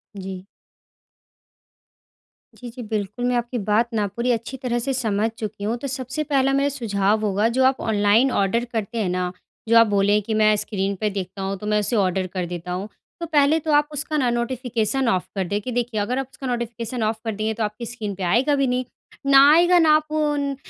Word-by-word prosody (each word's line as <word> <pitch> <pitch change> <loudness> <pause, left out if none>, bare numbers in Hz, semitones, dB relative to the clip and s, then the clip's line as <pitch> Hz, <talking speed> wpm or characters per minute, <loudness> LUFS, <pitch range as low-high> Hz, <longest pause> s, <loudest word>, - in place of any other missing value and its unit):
जी। 190 -1 -7 2.1
जी, 245 - -9
जी, 245 +2 -9
बिल्कुल, 215 +1 -3
मैं 250 0 +1
आपकी 240 +1 -2
बात 220 +3 +2
ना 215 -2 +1
पूरी 240 +1 0
अच्छी 235 +3 -3
तरह 245 -2 -2
से 270 +3 -2
समझ 220 -4 0
चुकी 210 -2 -6
हूँ 220 +3 0
तो 275 +3 -5
सबसे 265 +3 -3
पहला 270 -2 +1
मेरा 280 +1 +2
सुझाव 215 -5 0
होगा 205 +2 +1
जो 260 - +4
आप 260 0 +2
ऑनलाइन 220 +4 +3
ऑर्डर 230 +3 +1
करते 225 +1 -3
हैं 190 - 0
ना? 180 0 -1 0.4
जो 230 +1 +5
आप 230 -1 +7
बोले 205 0 +3
कि 220 +2 -4
मैं 215 0 +4
स्क्रीन 200 -1 -2
पे 215 - 0
देखता 195 -1 -5
हूँ 195 +1 -2
तो 210 - -6
मैं 210 0 +2
उसे 210 +3 -1
ऑर्डर 190 -2 +1
कर 180 -2 -2
देता 175 0 -6
हूँ। 190 +3 -3 0.3
तो 340 - -3
पहले 300 0 +3
तो 310 0 -2
आप 295 0 +4
उसका 300 +1 -3
ना 255 -4 +2
नोटिफिकेशन 240 +1 -1
ऑफ 185 -4 0
कर 195 - 0
दें, 205 +2 -1
कि 250 - -5
देखिए 240 -2 -1
अगर 245 +5 -1
आप 270 - -3
उसका 270 -3 -7
नोटिफिकेशन 235 -1 -3
ऑफ 220 +1 -1
कर 220 -2 -2
देंगे 215 +1 -1
तो 225 0 -3
आपकी 215 +3 -4
स्क्रीन 220 -4 -5
पे 190 - -6
आएगा 245 +11 +2
भी 275 -1 +1
नहीं, 250 0 -1 0.4
ना 275 0 +7
आएगा 350 +2 +5
ना 320 -2 +5
आप 305 0 -1
उन 295 -2 0
230 Hz, 215 wpm, -22 LUFS, 205-260 Hz, 2.1 s, आप